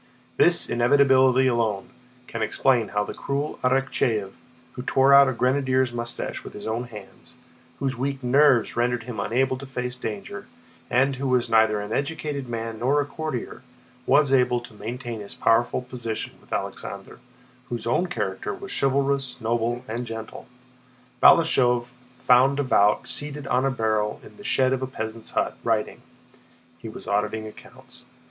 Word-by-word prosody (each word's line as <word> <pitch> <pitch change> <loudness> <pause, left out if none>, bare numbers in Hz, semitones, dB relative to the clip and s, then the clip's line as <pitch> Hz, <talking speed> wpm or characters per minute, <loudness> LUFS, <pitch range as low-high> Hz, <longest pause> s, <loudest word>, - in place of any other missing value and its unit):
This - - +4
inevitability 130 +1 +4
alone 115 -5 0 0.3
can 115 - -6
explain 115 +1 +2
how 105 +1 -1
the - - -6
cruel 140 +2 -3
Arakchéev, 125 -6 +1 0.4
who 125 - -7
tore 135 +2 +3
out 140 -1 +8
a - - 0
grenadier's 130 0 +1
mustache 120 0 -5
with - - -10
his 105 - -9
own 115 +2 -2
hands, 105 -5 -13 0.4
whose 135 -2 -2
weak 135 +2 -3
nerves 130 -1 +4
rendered 120 0 0
him 120 -2 -6
unable 130 +3 0
to 140 - -8
face 125 -1 -4
danger, 110 -5 -6 0.4
and 135 +2 +2
who 135 +1 -2
was 125 -2 +1
neither 110 -1 +4
an 105 +1 -5
educated 140 -2 -3
man 115 -1 -4
nor 135 +5 +2
a 145 - 0
courtier, 150 -5 -5 0.5
was 145 -2 +4
able 125 -2 +3
to 120 -1 -13
maintain 120 +2 -6
his 100 -1 -8
powerful 120 +2 +2
position 120 -3 -5
with - - -24
Alexander, - - -5 0.5
whose 120 -2 -4
own 145 +10 +1
character 105 - -3
was - - -8
chivalrous, 135 -1 +1
noble, 120 +2 -1
and 120 +2 -4
gentle. 115 -1 -8 0.7
Balashëv 125 -7 +5 0.4
found 130 +3 +5
Davout 105 -7 +2
seated 145 0 -5
on 125 +2 +1
a - - +3
barrel 110 -4 -1
in - - -15
the 205 - -12
shed 130 -8 +2
of 130 - -2
a 130 - -2
peasant's 110 -3 -6
hut, - - 0
writing—he - - -6
was - - -10
auditing 105 +2 -1
accounts. 110 - -14
125 Hz, 155 wpm, -24 LUFS, 115-135 Hz, 0.7 s, out